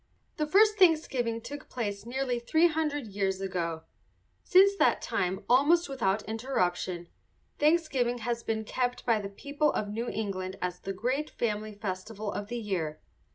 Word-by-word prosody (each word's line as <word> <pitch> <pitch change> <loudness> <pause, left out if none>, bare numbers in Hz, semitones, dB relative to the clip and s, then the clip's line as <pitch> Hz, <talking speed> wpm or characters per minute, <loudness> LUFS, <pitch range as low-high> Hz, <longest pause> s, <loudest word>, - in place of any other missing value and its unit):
The 305 - 0
first 425 +5 +5
Thanksgiving 265 -10 +3
took 290 +4 -8
place 210 -3 -4
nearly 250 -1 -1
three 315 +8 +3
hundred 300 -4 -1
years 195 -2 -1
ago. 170 -4 -3 0.6
Since 390 +2 +6
that - - +4
time, 185 +2 -2
almost 300 +8 +4
without 220 -7 0
interruption, 185 -7 -2 0.5
Thanksgiving 295 -6 +2
has 235 0 -2
been 220 -1 -2
kept 245 +2 -2
by 225 -3 +3
the 200 - -5
people 285 +8 0
of 205 - -2
New 230 +3 -3
England 190 -3 -3
as 180 0 -3
the 195 - -5
great 255 +10 -1
family 215 -2 -2
festival 205 +1 -4
of 205 - -4
the 240 +2 -4
year. 180 -9 -3
230 Hz, 155 wpm, -29 LUFS, 195-280 Hz, 0.6 s, Since